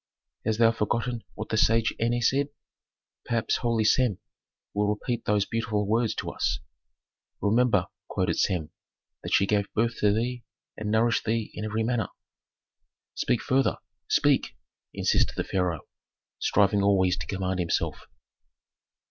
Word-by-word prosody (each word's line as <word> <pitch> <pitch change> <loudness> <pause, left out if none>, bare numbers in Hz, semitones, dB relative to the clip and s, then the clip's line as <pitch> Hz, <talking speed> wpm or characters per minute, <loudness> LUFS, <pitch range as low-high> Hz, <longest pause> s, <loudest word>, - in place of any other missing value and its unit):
"Hast 110 -1 0
thou 115 0 +5
forgotten 115 +1 -1
what 110 - -6
the 110 - 0
sage 115 +1 +3
Eney 120 +1 +1
said? 140 +5 +2 0.8
Perhaps 115 -2 0
holy 115 -3 +1
Sem 110 -2 +3 0.6
will 105 0 +1
repeat 115 +3 -2
those 105 -1 +2
beautiful 110 -2 -1
words 115 +1 +1
to - - -4
us." - - 0 0.8
"Remember," 115 +4 +3 0.2
quoted - - -1
Sem, 85 -4 0 0.5
"that - - -6
she 100 - +4
gave 100 0 0
birth 115 +1 +1
to 105 - +4
thee 120 +3 -1 0.3
and 105 -1 -4
nourished 115 +2 +2
thee 115 -1 -1
in 105 - -5
every 110 +1 -1
manner 115 -3 0 0.6
" - - -59
"Speak 120 - +1
further; 135 +1 +2 0.3
speak!" - - +2 0.3
insisted - - +1
the - - -1
pharaoh, 90 -4 -1 0.6
striving 100 0 +3
always 95 -2 +3
to - - -6
command 95 -1 -2
himself. 85 -2 -1
110 Hz, 140 wpm, -27 LUFS, 100-115 Hz, 0.8 s, thou